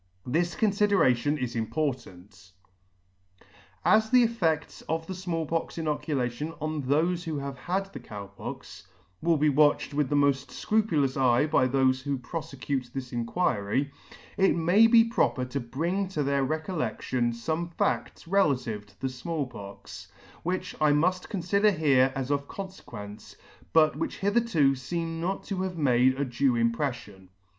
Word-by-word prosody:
This 170 +7 0
condderation 195 - +2
is 125 -4 -3
important. 110 - -4 1.3
As 220 0 +4
the 250 -1 +6
effeds 170 -10 -1
of 160 0 -1
the 190 - -5
Small 175 -3 -3
Pox 165 +2 -3
inoculation 150 -2 -2
on 155 0 -2
thofe 165 +6 +1
who 160 -2 -3
have 140 -1 -4
had 190 +9 -3
the 140 - -6
Cow 105 -4 -8
Pox, 100 0 -9 0.3
will 165 -1 +3
be 150 +1 +3
watched 145 +1 +3
with 145 -2 0
the 145 - +1
mod 140 -1 +5
fcrupulous 145 -3 0
eye 125 +2 +4
by 150 -4 +3
thofe 130 0 +2
who 140 0 -2
profecute 135 -2 -4
this 130 -2 -6
Inquiry, 120 - 0 0.5
it 195 - +4
may 175 +7 +5
be 230 0 +7
proper 225 - 0
to 130 +2 -3
bring 170 +11 -2
to 155 -6 -2
their 140 0 +1
recolledion 130 - -1
fome 160 +9 -3
fads - - -1
relative 130 - +1
to 100 - -24
the 135 - 0
Small 140 +4 -3
Pox, 100 -5 -10 0.3
which 180 +2 -3
I 150 -1 +5
mud 180 +5 +1
confider 200 +1 +2
here 135 -4 +4
as 135 0 -2
of 140 0 -1
confequence, 110 - -9 0.4
but 155 -2 +4
which 155 - -3
hitherto 200 -8 +2
feem 165 +5 -3
not 185 +4 -2
to 190 -2 -3
have 185 -2 -3
made 130 -3 +3
a 140 - +1
due 130 +1 +1
impredion. 115 -5 -2
145 Hz, 150 wpm, -27 LUFS, 130-175 Hz, 1.3 s, be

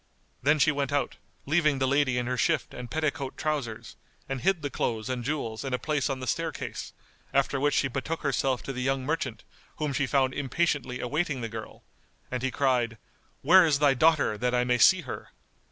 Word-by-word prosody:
Then 150 +4 +4
she 150 +1 +4
went 140 -1 -2
out, 145 0 -1 0.3
leaving 150 -1 +2
the 130 0 +1
lady 135 -2 +2
in 125 - 0
her 125 +1 -1
shift 125 - 0
and 125 -1 -7
petticoat 145 -3 -2
trousers, 140 -8 -3 0.3
and 135 -2 -3
hid 180 -3 +1
the 145 - -2
clothes 110 -1 -2
and 125 -1 -3
jewels 120 -5 -3
in 135 -2 -1
a - - -2
place 150 +1 -1
on 135 -1 -2
the 130 - -5
staircase; 120 - -3 0.4
after 140 0 +2
which 145 +1 +2
she 135 - +2
betook 135 +5 -3
herself 135 -2 0
to 135 - -5
the 125 - -4
young 135 0 0
merchant, 130 -7 -2 0.3
whom 150 -2 -2
she 135 0 0
found 130 -1 +2
impatiently 140 -3 -1
awaiting 140 +1 -1
the 115 - -3
girl, 110 0 -8 0.5
and 125 -1 -2
he 130 - 0
cried, 125 -4 +1 0.5
"Where 185 +1 +8
is 155 -4 +3
thy 145 -1 +4
daughter, 145 -6 +3
that 125 0 +1
I 125 - +3
may 125 0 +1
see 185 +9 +6
her?" 130 - -7
135 Hz, 200 wpm, -28 LUFS, 125-150 Hz, 0.5 s, Where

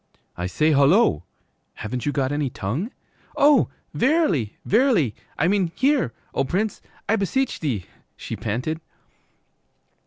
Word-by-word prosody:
'I 90 0 -3
say, 155 +11 +2
hullo! 140 - +4 0.5
Haven't 125 +5 -4
you - - +2
got 135 -2 0
any 145 -2 0
tongue?' 125 - -3 0.5
'Oh, 285 -3 +5 0.2
verily, 250 - +1
verily, 215 - +3 0.2
I 160 - +2
mean 190 -3 +1
hear, 265 - +2 0.2
O - - +1
Prince, 200 +10 -1 0.3
I 220 - +3
beseech,' 230 +7 -1 0.6
she - - -5
panted. 125 +9 -3
160 Hz, 120 wpm, -23 LUFS, -, 0.6 s, Oh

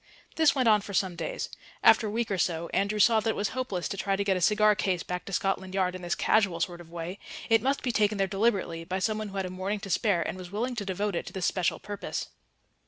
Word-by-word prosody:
This 315 -3 +4
went 255 -3 +2
on 210 -2 +5
for 200 0 -6
some 185 -2 +1
days. - - -4 0.4
After 220 - +6
a - - -2
week 225 +1 -2
or 190 - 0
so 170 0 0
Andrew 200 +2 +1
saw 225 +1 +5
that 220 +1 -1
it - - 0
was 205 - -1
hopeless 205 -9 -3
to 195 - -4
try 195 0 0
to 200 - 0
get 195 -1 +2
a 185 - -2
cigar 210 +3 +5
case 185 -3 -1
back 180 0 -4
to - - -7
Scotland 195 -2 -1
Yard 185 -2 +1
in 185 - -7
this 175 -1 -1
casual 195 -6 +2
sort 175 +1 -2
of 165 - -14
way; 170 +3 -6 0.3
it 225 -1 +6
must 270 +3 0
be 250 - +1
taken 210 -2 +2
there 195 - +2
deliberately 195 -5 0
by 185 +3 -3
somebody 215 +2 -1
who 195 - -7
had 190 - -1
a 180 - -5
morning 190 +3 -3
to 195 -2 -6
spare 175 -2 +2
and 185 - -5
was 180 -1 -8
willing 235 +6 -2
to 210 -4 -3
devote 200 +2 -1
it - - -3
to - - -8
this 190 -2 -2
special 185 -3 +1
purpose. 205 -1 -5
195 Hz, 270 wpm, -28 LUFS, 185-215 Hz, 0.4 s, After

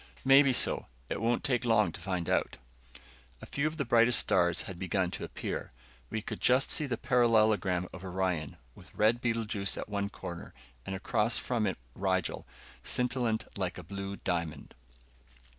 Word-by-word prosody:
"Maybe 135 +1 +7
so. 125 - +1 0.2
It - - -3
won't 120 +1 +1
take 125 -2 +1
long 105 -6 +3
to 95 - -10
find 90 -2 -2
out." - - 0 0.8
A - - -10
few 140 +2 -1
of 155 +1 -5
the 140 - -1
brightest 120 +1 +5
stars 85 -1 +3
had 90 -2 -8
begun 95 -1 0
to - - -6
appear. - - -5 0.4
We 110 - -3
could - - -5
just 125 +2 +4
see 150 - +1
the 120 -3 -2
parallelogram 110 -8 +3
of 95 - -9
Orion, 90 -5 -2 0.2
with - - -16
red 110 +3 +3
Betelguese 115 -5 0
at - - -5
one 100 -1 -2
corner, 85 -4 -8 0.3
and 95 - -3
across 105 +4 0
from 115 -4 -1
it - - -2 0.2
Rigel, 95 0 -1 0.3
scintillant 120 -4 0
like 90 -2 -2
a 90 - -8
blue 100 +3 -5
diamond. 85 -5 -3
105 Hz, 165 wpm, -30 LUFS, 95-120 Hz, 0.8 s, Maybe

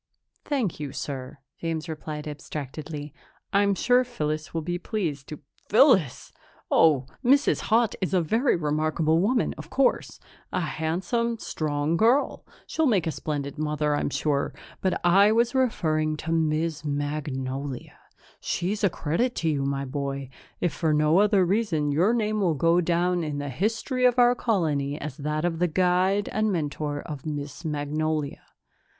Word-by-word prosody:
"Thank 250 - -1
you, 145 -2 -4
sir," 135 -1 -5 0.2
James 165 0 -3
replied 155 -1 -6
abstractedly. 150 0 -6 0.4
"I'm 200 0 +3
sure 245 +5 +3
Phyllis 155 -10 -3
will 165 -1 -3
be 175 +2 -2
pleased 165 - -3
to 150 - -8
" - - -37
"Phyllis! 210 - +4 0.4
Oh, 145 -5 +4 0.2
Mrs. 275 +3 +4
Haut 225 0 +3
is 185 - -1
a 185 - +3
very 225 - +2
remarkable 155 +1 +1
woman, 230 +7 +1
of - - -9
course. 270 -1 +1 0.3
A 185 - 0
handsome, 185 +9 -1
strong 155 -4 -1
girl; 240 +8 +2 0.2
she'll 320 -1 0
make 200 -9 +2
a 160 - 0
splendid 145 -1 -4
mother, 150 -1 0
I'm - - -1
sure. 145 -1 -1 0.3
But 185 -1 0
I 195 +4 +6
was 235 +2 +2
referring 155 - +1
to 165 - -4
Miss 160 -1 0
Magnolia. 145 -2 -4 0.4
She's 200 +5 -2
a 200 - +5
credit 175 +11 -1
to 165 - 0
you, 140 -3 0
my 140 0 -1
boy. 140 -1 -4 0.3
If 175 -5 0
for 155 0 +1
no 155 +4 +4
other 205 -2 +4
reason, 175 -7 +1
your 175 +9 +3
name 215 -2 0
will 170 -5 +2
go 165 +5 +3
down 175 +1 +1
in 150 -2 -3
the 145 0 -3
history 225 - -1
of 250 0 +4
our 245 0 +6
colony 155 - 0
as 145 -2 -6
that 150 +2 -2
of 165 -2 -1
the 180 - +3
guide 185 +4 +2
and 215 0 0
mentor 150 -3 -2
of 150 -2 -7
Miss 145 +1 -5
Magnolia. 150 -1 -2
160 Hz, 155 wpm, -26 LUFS, 150-200 Hz, 0.4 s, I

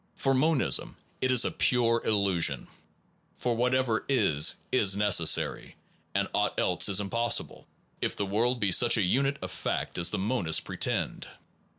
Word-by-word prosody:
For 135 - 0
monism, 145 +1 0 0.2
it 130 - +1
is 125 -2 +4
a - - -1
pure 115 -2 +1
illusion; 95 - 0 0.7
for 120 -1 -2
whatever 125 -1 0
is 75 - +2 0.2
is 100 -6 +2
necessary, 100 -6 +1 0.4
and - - 0
aught - - -1
else 90 +2 +1
is 100 0 +3
impossible, 115 +4 -2 0.3
if - - -2
the 100 - -3
world 115 +5 0
be 100 -4 0
such 120 +6 +4
a 105 - +1
unit 135 +9 0
of - - -5
fact - - -4
as 85 - +2
monists 95 -6 0
pretend. - - -3
110 Hz, 150 wpm, -27 LUFS, 95-125 Hz, 0.7 s, is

